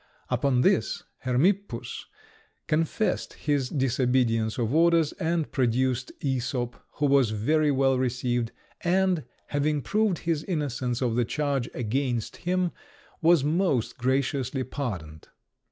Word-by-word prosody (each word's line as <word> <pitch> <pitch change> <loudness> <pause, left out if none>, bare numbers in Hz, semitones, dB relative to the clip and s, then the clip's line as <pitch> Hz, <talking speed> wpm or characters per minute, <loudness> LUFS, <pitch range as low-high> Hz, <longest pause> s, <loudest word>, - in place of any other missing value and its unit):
Upon 130 -3 +2
this - - +2 0.2
Hermippus 130 - 0 0.6
confessed 165 +7 0
his 145 -4 -1
disobedience 125 -4 +1
of 120 0 0
orders, 165 -1 +4
and 165 -1 0
produced 130 0 +1
Æsop, 125 -2 -1 0.2
who 150 - 0
was 135 -4 +4
very 150 +9 +2
well 135 -2 +3
received, 125 -2 -1 0.3
and, 180 -2 +2 0.2
having 145 0 0
proved 210 -4 +1
his 160 -2 -1
innocence 130 -7 -2
of 120 -2 0
the 120 - +3
charge 140 -3 -1
against 120 0 -1
him, 180 0 0 0.5
was 165 -3 +5
most 150 - 0
graciously 130 +1 0
pardoned. 95 - -5
135 Hz, 115 wpm, -27 LUFS, 125-155 Hz, 0.6 s, was